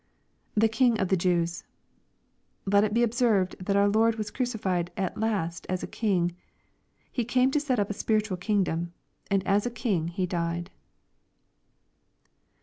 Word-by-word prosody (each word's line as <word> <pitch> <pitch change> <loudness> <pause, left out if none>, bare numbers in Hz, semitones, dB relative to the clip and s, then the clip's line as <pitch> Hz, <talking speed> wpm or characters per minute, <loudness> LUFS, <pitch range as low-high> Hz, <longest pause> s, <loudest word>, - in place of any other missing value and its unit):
[The 220 +1 +4
King 225 +1 +2
of 190 - 0
the 190 - +4
Jews.'\ 170 -2 0 1.0
Let 200 +1 +4
it 215 - 0
be 235 +2 +3
observed, 225 -5 +2
that 200 +1 0
our 200 0 +4
Lord 220 +2 +3
was 215 -2 -4
crucified 205 -9 -1
at 190 -2 -2
last 195 -7 -2
as 185 0 -2
a - - -1
King. 180 -6 0 0.8
He 245 - -1
came 255 +3 +2
to 295 - +2
set 280 -4 0
up 205 0 0
a - - -1
spiritual 215 -2 0
kingdom, 175 -3 -1 0.4
and 195 -1 +1
as 205 +3 +2
a - - 0
King 220 -9 -1
He 180 +2 -2
died. 170 -1 -3
200 Hz, 155 wpm, -27 LUFS, 180-225 Hz, 1.0 s, The